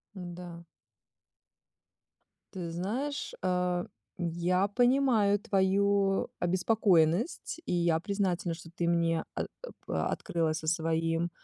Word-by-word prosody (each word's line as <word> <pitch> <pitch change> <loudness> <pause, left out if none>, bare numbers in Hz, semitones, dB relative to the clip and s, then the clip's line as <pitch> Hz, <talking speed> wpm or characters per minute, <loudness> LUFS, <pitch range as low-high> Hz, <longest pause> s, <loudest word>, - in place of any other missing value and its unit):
Да. 175 -2 -8 1.9
Ты 175 -4 -5
знаешь, 235 +12 -3
э, 180 -1 0 0.3
я 175 +3 +1
понимаю 240 -2 +3
твою 195 0 +2
обеспокоенность, 185 - +2
и - - -2
я 170 -2 +2
признательна, 190 -2 -1
что 165 0 -10
ты 170 - -1
мне 170 -1 +2
о - - -1 0.2
оп - - -11
открылась 160 -1 -1
со 155 - -8
своим, 165 +1 0
180 Hz, 100 wpm, -30 LUFS, 170-200 Hz, 1.9 s, понимаю